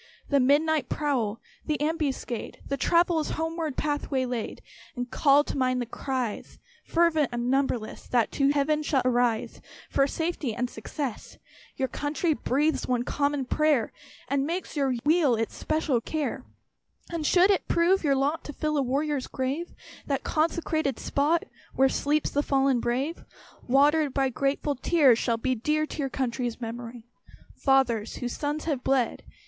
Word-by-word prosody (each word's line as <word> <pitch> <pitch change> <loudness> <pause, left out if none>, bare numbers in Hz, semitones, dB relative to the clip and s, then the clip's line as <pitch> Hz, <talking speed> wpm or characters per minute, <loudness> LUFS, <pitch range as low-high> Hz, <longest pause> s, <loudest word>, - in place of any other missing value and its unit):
The 280 - +4
midnight 290 +1 +3
prowl 245 -8 -1 0.3
the 305 - 0
ambuscade 295 -6 -2
The 275 - -1
traveller's 335 +1 +2
homeward 325 -2 -2
path 290 -1 -1
waylaid! 250 -4 -2 0.4
And 245 0 -4
call 285 0 +4
to - - -5
mind 255 -2 +1
the 245 - -1
cries, 250 -1 -4 0.3
Fervent 330 -4 +2
and 240 +1 -1
numberless, 265 -5 -1
That 240 -3 +1
shall 275 - +2
to - - +4
Heaven 300 +2 +1 0.2
arise 245 -3 +1 0.3
For 275 - +3
safety 320 -7 -2
and 250 +1 -2
success. 255 +2 -6 0.4
Your 265 - 0
country 300 +4 -1
breathes 295 +2 0
one 245 -1 +1
common 285 0 0
prayer, 295 -4 +1 0.3
And 280 +1 0
makes 350 +2 -4
your 270 -3 +1
weal 305 -5 +4
its 225 0 -2
special 310 -6 0
care. 305 +3 -3 0.7
And 335 -2 -2
should 360 +6 +5
it 390 - 0
prove 345 +3 +3
your 280 -3 +3
lot 285 +4 0
To 295 - -6
fill 305 +1 -1
a - - +3
warrior's 275 +1 -1
grave, 270 +6 -3 0.4
That 275 -2 -1
consecrated 315 -3 0
spot 310 +4 +1 0.3
Where 270 0 +4
sleeps 295 +3 0
"the 290 - +1
fallen 270 -3 +2
brave," 260 +8 -2 0.4
Watered 285 +2 +3
by 270 -1 +2
grateful 275 +3 0
tears, 270 -3 +4
shall 235 -2 0
be 255 +3 0
Dear 300 +6 0
to 305 - -9
your 275 -2 -1
country's 245 -2 -2
memory. 235 0 -7 0.5
Fathers, 250 -6 +1
whose 245 -1 -4
sons 295 +1 -2
have 285 -6 -2
bled! 265 -3 +1
275 Hz, 155 wpm, -27 LUFS, 250-305 Hz, 0.7 s, should